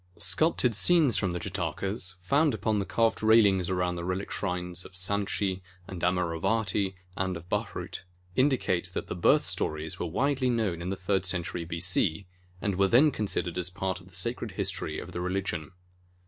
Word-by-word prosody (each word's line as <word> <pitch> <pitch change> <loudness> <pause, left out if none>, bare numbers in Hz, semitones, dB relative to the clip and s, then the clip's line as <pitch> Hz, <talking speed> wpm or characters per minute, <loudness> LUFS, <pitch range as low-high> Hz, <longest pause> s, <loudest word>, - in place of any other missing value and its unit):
Sculptured 155 -7 +3
scenes 145 - +5
from 100 - +1
the 90 0 -3
Jatakas, 95 +1 -2
found 140 - +2
upon 110 -1 0
the 100 - -3
carved 115 -1 +1
railings 105 -5 +4
around 90 -1 0
the 85 - -4
relic 95 +2 -3
shrines 90 -2 -2
of - - -13
Sanchi 95 0 -1 0.3
and 90 -3 -7
Amaravati 95 +3 0 0.2
and 95 -2 -1
of 85 +1 -12
Bharhut, - - -3 0.3
indicate 130 -9 +1
that - - -2
the - - -5
"Birth - - +4
stories" 75 +1 -1
were - - -2
widely 130 - +1
known 105 -8 0
in 90 - -4
the 95 - -1
third 95 0 0
century 90 -2 -2
B.C., 85 +1 +1 0.3
and 100 -1 -1
were 100 - +5
then 135 +9 +5
considered 90 -6 -2
as 90 0 -1
part 95 +1 -3
of 90 - -17
the 90 - -13
sacred 115 +2 -3
history - - -2
of - - -7
the 90 - -4
religion. 90 -3 -2
95 Hz, 175 wpm, -28 LUFS, 90-110 Hz, 0.3 s, scenes